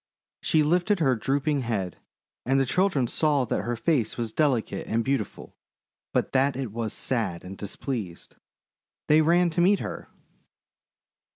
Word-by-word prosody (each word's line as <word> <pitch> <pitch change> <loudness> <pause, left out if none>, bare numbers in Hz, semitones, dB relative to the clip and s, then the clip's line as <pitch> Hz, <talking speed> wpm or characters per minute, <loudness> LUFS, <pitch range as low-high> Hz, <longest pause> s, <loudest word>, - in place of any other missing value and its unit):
She 155 -1 +3
lifted 180 +6 +2
her 135 -6 +3
drooping 140 +5 0
head, 100 -8 -3 0.4
and 135 +2 +2
the 135 - +2
children 160 -2 +2
saw 145 +1 +1
that - - -1
her 120 0 -1
face 120 -2 0
was 115 -2 -3
delicate 140 -7 0
and 115 0 0
beautiful, 135 -7 -3 0.6
but - - 0
that 135 0 +2
it 130 -5 -4
was 115 -1 -3
sad 115 -10 -2
and 95 +1 -8
displeased. 100 -2 -6 0.7
They 155 +1 +6
ran 170 +2 +3
to 175 - 0
meet 195 +3 +5
her. - - -6
135 Hz, 150 wpm, -26 LUFS, 115-155 Hz, 0.7 s, They